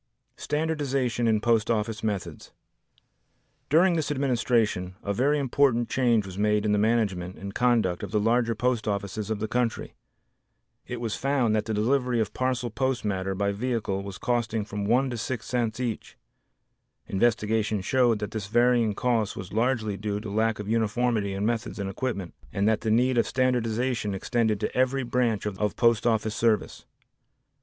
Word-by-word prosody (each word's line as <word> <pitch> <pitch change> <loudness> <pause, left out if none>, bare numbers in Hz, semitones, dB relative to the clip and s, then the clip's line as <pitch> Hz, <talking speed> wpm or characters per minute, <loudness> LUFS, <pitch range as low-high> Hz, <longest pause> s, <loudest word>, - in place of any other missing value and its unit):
Standardization 140 -6 -1
in 110 -1 +3
Post 115 -1 +2
Office 110 -1 -1
Methods 100 -5 -4 1.2
During 170 +4 +4
this 160 -3 -1
administration 120 -9 0
a 100 - -1
very 140 +8 +2
important 130 -3 +2
change 120 -5 +2
was 95 0 -8
made 105 0 +2
in 105 - +2
the 105 - +2
management 100 -5 0
and 100 0 -7
conduct 115 -8 +2
of 100 - -5
the 105 +2 +1
larger 115 +2 +2
post 120 -1 0
offices 100 +1 -3
of 110 - -1
the 110 +1 -3
country. 120 0 -1 0.9
It 125 - -5
was 115 -3 -2
found 130 -5 +1
that 105 -1 0
the 110 - -2
delivery 125 +2 +1
of 110 -2 -1
parcel 130 -2 -1
post 130 +1 -1
matter 95 -1 -1
by 100 +1 0
vehicle 105 -3 -2
was 100 0 -7
costing 115 -3 -1
from 105 -1 -4
1 125 +5 +2
to 120 - -3
6 115 +1 -4
cents 120 -2 -1
each. 120 -3 -4 0.9
Investigation 110 0 +1
showed 120 +2 +2
that 105 0 -5
this 110 -3 -4
varying 120 -1 +3
cost 115 -3 0
was 95 -4 -7
largely 110 -3 0
due 105 +1 -3
to 105 -1 -7
lack 110 +1 +1
of 105 - -6
uniformity 110 -1 0
in 100 +1 -1
methods 115 0 -2
and 100 -2 -3
equipment 100 -5 -4 0.2
and 100 +1 0
that 110 -1 +2
the 110 - -1
need 125 +3 +3
of - - +2
standardization 120 -3 0
extended 110 +1 0
to - - -3
every 130 +1 +1
branch 120 -4 0
of 105 0 -2
post 115 -1 +3
office 110 -2 +1
service. 115 -4 0
115 Hz, 170 wpm, -26 LUFS, 105-125 Hz, 1.2 s, During